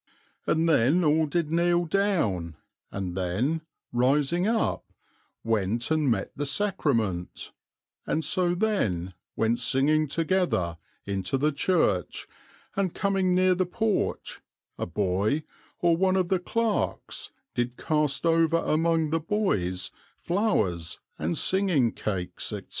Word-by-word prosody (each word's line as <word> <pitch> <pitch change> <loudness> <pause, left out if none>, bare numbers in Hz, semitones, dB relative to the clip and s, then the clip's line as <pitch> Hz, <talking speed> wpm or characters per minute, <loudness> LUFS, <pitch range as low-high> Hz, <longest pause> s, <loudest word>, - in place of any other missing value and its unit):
and 165 +1 +2
then 155 +3 +3
all 155 0 +3
did 160 0 -1
kneel 175 +1 +2
down, 155 - 0 0.4
and 95 -3 -4
then, 105 - -1 0.3
rising 145 +9 +2
up, 225 0 -1 0.5
went 115 +3 0
and 155 -3 +2
met 115 - 0
the 145 - -3
Sacrament, 115 - -1 0.6
and 160 - 0
so 180 -2 +2
then, 100 - 0 0.2
went 115 +1 +1
singing 150 +5 +2
together, 160 - 0 0.3
into 100 +4 -1
the 150 +3 +2
Church, 140 - 0 0.5
and 195 -3 -1
coming 195 -2 +1
near 185 0 +4
the 180 0 0
Porch, 220 +2 -1 0.3
a - - -4
Boy, 100 - 0 0.4
or 170 -1 +4
one 185 +2 +2
of 185 -2 +1
the 190 - +2
Clerks, 225 +4 -2 0.2
did 120 0 -2
cast 150 -2 0
over 165 0 +3
among 160 -1 +1
the 165 - +2
Boys 100 - -1 0.3
flowers, 105 - 0 0.2
and 80 +3 -1
singing 180 - +3
cakes, 95 -4 -3
&c." - - -4
155 Hz, 125 wpm, -27 LUFS, 110-180 Hz, 0.6 s, near